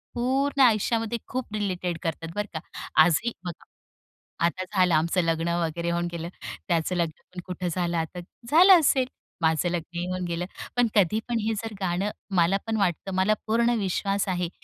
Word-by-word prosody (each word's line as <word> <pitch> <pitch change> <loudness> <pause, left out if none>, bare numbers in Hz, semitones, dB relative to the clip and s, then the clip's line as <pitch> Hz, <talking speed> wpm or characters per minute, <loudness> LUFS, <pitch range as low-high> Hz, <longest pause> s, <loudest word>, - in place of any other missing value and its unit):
पूर्ण 270 +3 +1
आयुष्यामध्ये 225 -1 +3
खूप 255 -4 -4
रिलेटेड 185 -4 -2
करतात 165 0 -3
बरं 210 0 -1
का, 160 - -3 0.4
आजही 175 +8 +2
बघा. 175 -2 -7 0.8
आता 180 +2 -1
झालं 185 -3 +3
आमचं 165 +4 +2
लग्न 165 0 0 0.2
वगैरे 170 +2 -3
होऊन 175 0 0
गेलं. 170 0 -5 0.4
त्याचं 170 0 +1
लग्न 170 +1 -4
कुठं 180 -1 -4
झालं 175 0 -1
आता 165 +2 -3 0.3
झालं 360 +4 +8
असेल. 270 -4 +3 0.3
माझं 160 +2 +2
लग्न 175 0 -3
होऊन 185 0 -2
गेलं. 170 +1 -2 0.3
पण 245 - +4
कधी 205 +1 +4
पण 235 -1 +1
हे 225 +1 0
जर 225 - -5
गाणं 185 +2 0 0.3
मला 175 +3 +4
पण 225 -1 0
वाटतं 190 0 -1
मला 190 +3 +3
पूर्ण 235 +2 +3
विश्वास 195 +1 0
आहे. 180 -2 -1
185 Hz, 165 wpm, -26 LUFS, 170-220 Hz, 0.8 s, झालं